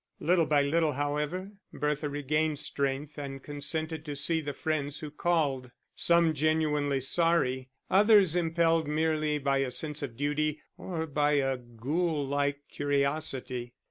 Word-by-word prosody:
Little 170 -1 +3
by 145 -2 +3
little, 155 +1 +2
however, 150 +7 -2 0.2
Bertha 150 0 -1
regained 150 +2 0
strength 140 +1 -2
and 135 -2 -6
consented 155 +2 -4
to 145 -2 -4
see 160 +4 +1
the 145 -1 -4
friends 145 -1 -2
who 150 -1 -6
called, 150 -6 0 0.3
some 170 -1 +4
genuinely 150 -2 +1
sorry, 135 -3 +1 0.2
others 200 -3 +5
impelled 165 -2 +2
merely 155 0 +1
by 140 -1 +1
a 135 -1 0
sense 150 +3 -3
of 125 -5 -5
duty 150 +2 0 0.2
or 165 -3 -4
by 150 -1 +1
a 135 -2 +2
ghoul 140 +6 -2
like 140 +1 -1
curiosity. 140 -4 -2
150 Hz, 140 wpm, -29 LUFS, 140-160 Hz, 0.3 s, others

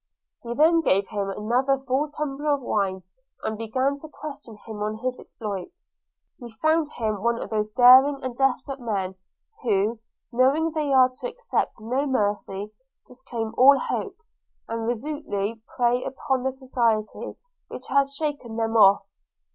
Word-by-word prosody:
He 235 - -7
then 330 +4 +5
gave 195 -9 +2
him 200 -2 -2
another 245 +7 +1
full 270 +3 -1
tumbler 295 0 -1
of 280 - -8
wine, 195 -5 -1 0.4
and 220 - -2
began 255 +6 -1
to 315 - -11
question 285 -7 -9
him 220 -2 -7
on 215 +1 -2
his 250 +2 -3
exploits. 205 - -8 0.4
He 235 -3 -10
found 315 -1 +2
him 215 -4 -2
one 235 +1 +1
of - - -6
those 215 -1 0
daring 255 +4 +7
and 255 -2 -4
desperate 270 +1 0
me, 200 -6 -2 0.5
who, 215 -1 +1 0.3
knowing 275 +7 +3
they 305 -3 -1
are 260 -1 +6
to - - -3
expect 485 - -2
no 255 +6 -1
mercy, 205 -4 -1 0.3
disclaim 235 -3 -6
all 275 +2 +8
hope, - - -3 0.5
and 230 0 -3
resolutely 230 -4 -3 0.2
prey 245 0 +2
upon 265 -1 -2
the 265 +1 0
society, 240 -5 -1 0.3
which 255 - -9
has 275 +1 +2
shaken 285 -6 -3
them 225 0 -1
off. 200 -3 +6
250 Hz, 150 wpm, -25 LUFS, 215-275 Hz, 0.5 s, all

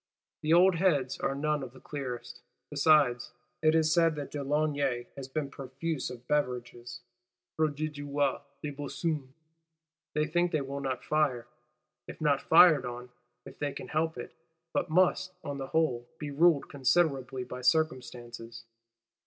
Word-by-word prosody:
The 155 - -1
old 180 +1 +6
heads 145 -8 +1
are 135 - -1
none 150 +1 0
of 125 -2 -7
the 130 - -14
clearest; 125 -4 -6 0.3
besides, 140 -4 +3 0.3
it 155 0 +4
is 155 -1 +3
said, 165 -1 +3 0.2
de 145 -1 -4
Launay 140 -4 0
has 135 -1 -7
been 140 0 -3
profuse 135 +3 -4
of 125 -1 -10
beverages 120 -4 -2 0.5
(prodigua 145 -2 -1 0.2
des 150 - -3
buissons). 145 0 -3 0.9
They 150 0 +2
think, 175 +2 +1
they 155 - +2
will 140 +1 -5
not 130 -2 -3
fire,—if 145 -6 -4
not 145 -3 +2
fired 160 -4 +7
on, 125 0 -6 0.4
if 135 0 -12
they 145 -1 -2
can - - -8
help 160 +1 0
it; - - -7 0.4
but - - 0
must, 185 +2 +2
on 145 -2 -5
the 135 - -4
whole, 130 -7 0
be 150 -2 -5
ruled 155 0 +4
considerably 135 -2 +1
by 125 0 -7
circumstances. 120 -4 -1
145 Hz, 145 wpm, -30 LUFS, 130-155 Hz, 0.9 s, fired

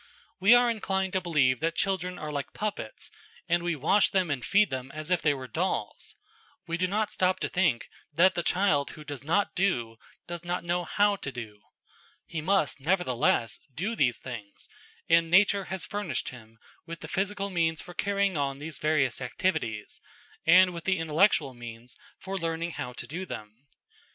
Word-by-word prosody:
We 200 +6 +7
are 245 0 +5
inclined 190 -4 -1
to 190 - +1
believe 140 -8 +2
that 165 +1 -1
children 180 -2 -1
are 150 -2 -5
like 145 -1 -4
puppets, 205 - -5 0.4
and 170 +1 +2
we 175 -1 -1
wash 160 +9 +3
them 185 -5 +1
and 130 -4 -2
feed 200 -3 +3
them 130 0 -4
as 155 +3 -5
if 180 - +3
they 150 -1 +3
were 130 -1 -7
dolls. 115 - -3 0.5
We 165 - -2
do 185 +2 +1
not 210 +3 0
stop 185 0 +1
to - - 0
think 175 -10 +1 0.2
that 175 +5 +5
the 175 - 0
child 165 -6 +2
who 155 - -9
does 145 -3 -7
not 180 +7 +1
do, 120 -13 0 0.3
does 175 -1 -6
not 175 0 -2
know 175 +1 -1
how 205 +4 +2
to 140 - -4
do. 110 -5 -8 0.6
He 160 - -4
must, 155 -6 +1
nevertheless, 135 - +1 0.2
do 205 +8 -2
these 125 - +2
things, 115 -6 -8 0.4
and 165 0 +4
nature 195 +2 +4
has 190 -2 -4
furnished 205 -8 -3
him 115 -3 -13 0.3
with 165 0 -7
the - - -7
physical 200 +1 -2
means 165 -3 +1
for 175 - -9
carrying 200 0 0
on 140 -2 -1
these 150 +2 -7
various 145 -5 +1
activities, 120 - -2 0.5
and 180 +2 +7
with 170 -1 -7
the 190 -1 +2
intellectual 160 -3 +2
means 120 0 -9 0.2
for 195 0 -5
learning 165 0 -2
how 125 - -5
to - - -7
do 175 +5 -5
them. 110 - -9
165 Hz, 180 wpm, -28 LUFS, 140-190 Hz, 0.6 s, We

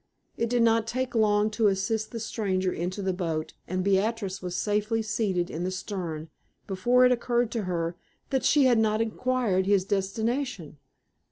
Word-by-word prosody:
It 230 - -1
did 240 -1 +3
not 225 -1 +3
take 255 +2 -2
long 210 -1 +3
to 215 0 +2
assist 200 +3 0
the 230 - -6
stranger 190 -4 -1
into 185 +4 -3
the 190 -1 0
boat, 165 -4 -3
and 185 +1 -1
Beatrix 200 0 0
was 180 -1 -4
safely 210 +3 0
seated 200 -5 -1
in 165 - -4
the 185 - -1
stern 175 -5 -5 0.3
before 240 +7 +3
it 250 - +5
occurred 240 -1 +1
to 225 -4 -2
her 170 -1 -2 0.4
that 265 -1 +1
she 290 -2 +4
had 240 -3 +4
not 215 -1 +2
inquired 225 -4 0
his 200 -2 +3
destination. 200 - -2
210 Hz, 170 wpm, -27 LUFS, 185-230 Hz, 0.4 s, it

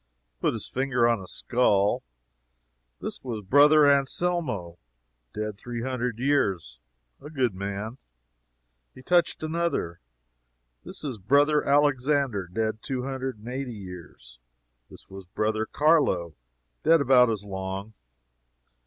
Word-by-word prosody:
He - - -49
put - - +1
his - - -6
finger 130 -2 +1
on 115 -3 +1
a 95 - -10
skull. 105 -4 +1 1.0
"This - - -6
was 115 -5 -5
Brother 145 +7 +6
Anselmo 140 - 0 0.5
dead 105 +2 -5
three 120 0 -5
hundred 125 -3 -2
years 95 - 0 0.4
a 150 - -9
good 130 -8 0
man." 100 +6 -5 1.0
He 130 - -13
touched 175 +1 +2
another. 160 - -2 0.8
"This - - -10
was 130 -7 -5
Brother 145 +8 +3
Alexander 140 -7 +1
dead 110 +2 -2
two 130 -2 -3
hundred 130 -2 -4
and 105 +2 -14
eighty 125 -1 -4
years. 85 - -11 0.5
This - - -14
was 95 -1 -11
Brother 110 +3 -1
Carlo 145 - +2 0.5
dead 165 +1 +5
about 125 -3 +5
as 105 -3 -2
long." 95 +1 -5
120 Hz, 125 wpm, -26 LUFS, 100-140 Hz, 1.0 s, Brother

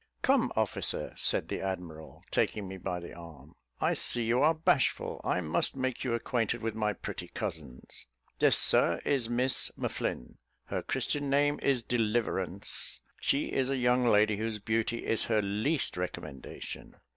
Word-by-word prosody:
"Come, - - +3
officer," - - +1
said - - +1
the - - -3
admiral, 90 -5 -6
taking 105 -3 0
me 95 0 -7
by 90 -1 -3
the 85 - -9
arm, 80 -3 -12 0.3
"I - - +2
see 120 - 0
you 115 +3 +2
are 160 +2 +5
bashful 160 - +1
I 90 - 0
must 80 - +1
make 130 -2 -2
you 120 -3 0
acquainted 115 -1 -1
with 115 -1 -1
my 105 -1 0
pretty - - -6
cousins. 70 -6 -6 0.3
This, - - +6
Sir, - - +4
is 130 -5 +1
Miss 125 +2 +2
M'Flinn - - -3 0.3
her - - -3
Christian 145 -1 -1
name 145 +1 +2
is 130 -4 +2
Deliverance. 110 -5 0 0.2
She 140 - 0
is 130 -1 +1
a 135 - 0
young 125 0 +3
lady 105 -2 +4
whose 110 0 -2
beauty 115 +2 -1
is 115 - +1
her 110 -2 +2
least 110 +10 0
recommendation." 90 -6 -6
110 Hz, 155 wpm, -30 LUFS, 95-125 Hz, 0.3 s, This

